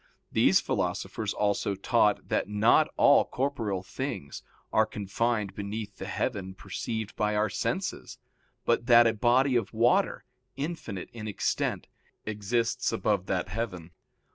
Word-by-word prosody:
These -, -, +5 dB
philosophers 110 Hz, -2 st, -2 dB
also 100 Hz, -1 st, 0 dB
taught 105 Hz, +1 st, +2 dB
that -, -, 0 dB
not 110 Hz, +9 st, +4 dB
all 145 Hz, -, +6 dB
corporeal 115 Hz, -9 st, -2 dB
things 100 Hz, -, -5 dB, 0.3 s
are -, -, +4 dB
confined 105 Hz, 0 st, -1 dB
beneath 100 Hz, 0 st, -5 dB
the 95 Hz, -, -6 dB
heaven 100 Hz, -4 st, -3 dB
perceived 110 Hz, +2 st, -5 dB
by 105 Hz, 0 st, 0 dB
our 105 Hz, -1 st, +1 dB
senses, -, -, -3 dB, 0.5 s
but 120 Hz, 0 st, +1 dB
that 120 Hz, -1 st, +8 dB
a 115 Hz, -, +3 dB
body 125 Hz, +4 st, +3 dB
of 115 Hz, -2 st, -1 dB
water, 150 Hz, -, +2 dB, 0.3 s
infinite 135 Hz, -, -5 dB
in 110 Hz, -2 st, -6 dB
extent, 105 Hz, -, -1 dB, 0.4 s
exists 115 Hz, +3 st, -1 dB
above 105 Hz, -4 st, 0 dB
that 95 Hz, 0 st, -1 dB
heaven. 90 Hz, -5 st, -4 dB
110 Hz, 130 wpm, -28 LUFS, 100-120 Hz, 0.5 s, that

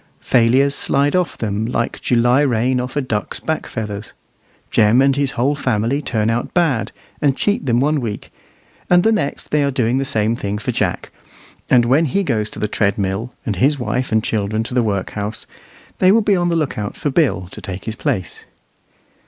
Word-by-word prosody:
Failures 130 Hz, +4 st, +3 dB
slide 140 Hz, +2 st, +1 dB
off 180 Hz, -2 st, 0 dB
them 105 Hz, -1 st, -2 dB
like 120 Hz, -1 st, -2 dB
July 120 Hz, +2 st, +3 dB
rain 125 Hz, -1 st, +1 dB
off 125 Hz, +1 st, -4 dB
a 145 Hz, -, +1 dB
duck's 110 Hz, -6 st, -3 dB
back 160 Hz, 0 st, -3 dB
feathers. 105 Hz, -1 st, -6 dB, 0.6 s
Jem 110 Hz, +3 st, +4 dB
and 135 Hz, 0 st, +4 dB
his 140 Hz, -1 st, 0 dB
whole 130 Hz, +5 st, +1 dB
family 125 Hz, -1 st, 0 dB
turn 110 Hz, -6 st, -1 dB
out 115 Hz, +1 st, -2 dB
bad, 155 Hz, -10 st, +1 dB, 0.3 s
and 140 Hz, -2 st, +2 dB
cheat 205 Hz, -8 st, 0 dB
them 120 Hz, -1 st, +3 dB
one 145 Hz, +2 st, +1 dB
week, 110 Hz, -4 st, -5 dB, 0.6 s
and 175 Hz, 0 st, +5 dB
the 225 Hz, -, +4 dB
next 210 Hz, -10 st, -2 dB
they 150 Hz, -1 st, +3 dB
are 140 Hz, -, +1 dB
doing 125 Hz, -1 st, 0 dB
the -, -, 0 dB
same 110 Hz, -3 st, 0 dB
thing 100 Hz, -2 st, -3 dB
for 120 Hz, +4 st, -3 dB
Jack; 105 Hz, -6 st, -2 dB, 0.6 s
and 120 Hz, -2 st, +5 dB
when 135 Hz, +7 st, +3 dB
he 195 Hz, +7 st, 0 dB
goes 110 Hz, -, -1 dB
to -, -, -9 dB
the 105 Hz, -, -1 dB
treadmill, 100 Hz, +2 st, -1 dB
and 105 Hz, -5 st, -2 dB
his 140 Hz, +9 st, +3 dB
wife 125 Hz, 0 st, -2 dB
and 110 Hz, -1 st, +2 dB
children 110 Hz, 0 st, -1 dB
to 120 Hz, -, -7 dB
the 125 Hz, -, +3 dB
workhouse, 105 Hz, 0 st, -3 dB, 0.5 s
they 185 Hz, -, +5 dB
will 225 Hz, +3 st, +4 dB
be 205 Hz, -1 st, +2 dB
on 175 Hz, -1 st, +1 dB
the 170 Hz, -, +1 dB
lookout 135 Hz, -10 st, -2 dB
for 145 Hz, -, -2 dB
Bill 130 Hz, -, +1 dB
to -, -, -10 dB
take 95 Hz, 0 st, -7 dB
his 110 Hz, -, -4 dB
place. 95 Hz, -5 st, -3 dB
125 Hz, 195 wpm, -19 LUFS, 110-140 Hz, 0.6 s, and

